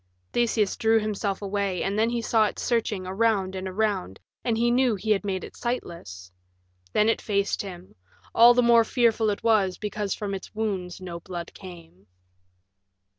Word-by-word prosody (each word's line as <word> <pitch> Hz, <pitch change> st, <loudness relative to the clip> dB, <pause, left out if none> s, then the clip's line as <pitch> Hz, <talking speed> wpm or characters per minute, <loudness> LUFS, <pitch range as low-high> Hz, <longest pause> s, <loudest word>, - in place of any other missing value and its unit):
Theseus 225 Hz, -4 st, +1 dB
drew 225 Hz, 0 st, +3 dB
himself 205 Hz, -2 st, -2 dB
away, 200 Hz, -2 st, -1 dB
and 195 Hz, +1 st, -1 dB
then 225 Hz, +1 st, +3 dB
he 235 Hz, -1 st, -2 dB
saw 220 Hz, -2 st, +3 dB
it -, -, -6 dB
searching 215 Hz, -5 st, -1 dB
around 195 Hz, -1 st, +1 dB
and 190 Hz, 0 st, -4 dB
around, 190 Hz, -, -1 dB, 0.2 s
and 230 Hz, -2 st, 0 dB
he 240 Hz, +1 st, +2 dB
knew 250 Hz, -2 st, +3 dB
he 215 Hz, +3 st, -2 dB
had 205 Hz, -1 st, +2 dB
made 190 Hz, -2 st, -2 dB
it -, -, -10 dB
sightless. 170 Hz, -, -5 dB, 0.6 s
Then 210 Hz, -, +3 dB
it 225 Hz, -, +1 dB
faced 200 Hz, -2 st, 0 dB
him; 185 Hz, -2 st, -9 dB, 0.4 s
all 240 Hz, +1 st, +7 dB
the 245 Hz, -, +4 dB
more 235 Hz, -1 st, +6 dB
fearful 225 Hz, -2 st, +2 dB
it 205 Hz, -, -3 dB
was 205 Hz, -5 st, +2 dB
because 210 Hz, -2 st, -3 dB
from 205 Hz, -2 st, -4 dB
its 195 Hz, +2 st, -7 dB
wounds 190 Hz, -5 st, -3 dB
no 175 Hz, -2 st, -6 dB
blood 175 Hz, -1 st, -7 dB
came. 170 Hz, -, -13 dB
205 Hz, 175 wpm, -26 LUFS, 185-225 Hz, 0.6 s, all